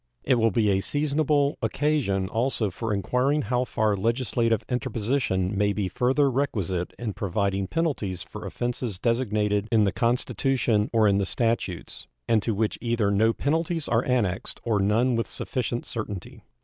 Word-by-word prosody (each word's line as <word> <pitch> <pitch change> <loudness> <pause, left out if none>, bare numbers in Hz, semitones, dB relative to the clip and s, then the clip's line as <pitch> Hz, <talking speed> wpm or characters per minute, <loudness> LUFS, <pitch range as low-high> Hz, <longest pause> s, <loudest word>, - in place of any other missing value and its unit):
It 130 -3 +3
will 115 0 +4
be 105 0 +2
a 95 - +2
seasonable 145 +3 +1
occasion 135 -11 0
also 115 -1 -1
for 110 +4 -4
inquiring 125 +9 +1
how 125 0 0
far 110 -3 +1
legislative 115 +1 0
interposition 110 -5 -1
may 100 +1 +2
be 100 -2 -1
further 130 +8 +2
requisite 100 - -1
in 115 -4 -4
providing 100 -1 -1
penalties 110 - -1
for - - -8
offenses 120 -4 -3
designated 105 -2 0
in 110 -2 +4
the 100 - +2
Constitution 120 -2 +1
or 110 -2 +4
in 100 -1 +3
the 100 - +1
statutes, 115 -7 -2 0.2
and 110 -2 +3
to 110 0 -1
which 110 +1 -1
either 115 -4 +1
no 110 +3 +3
penalties 160 +5 -1
are 120 +1 +2
annexed 110 -6 -1
or 110 -3 +1
none 115 +6 +2
with 115 - -1
sufficient 120 -2 -3
certainty. 105 -5 -6
115 Hz, 155 wpm, -26 LUFS, 100-125 Hz, 0.2 s, will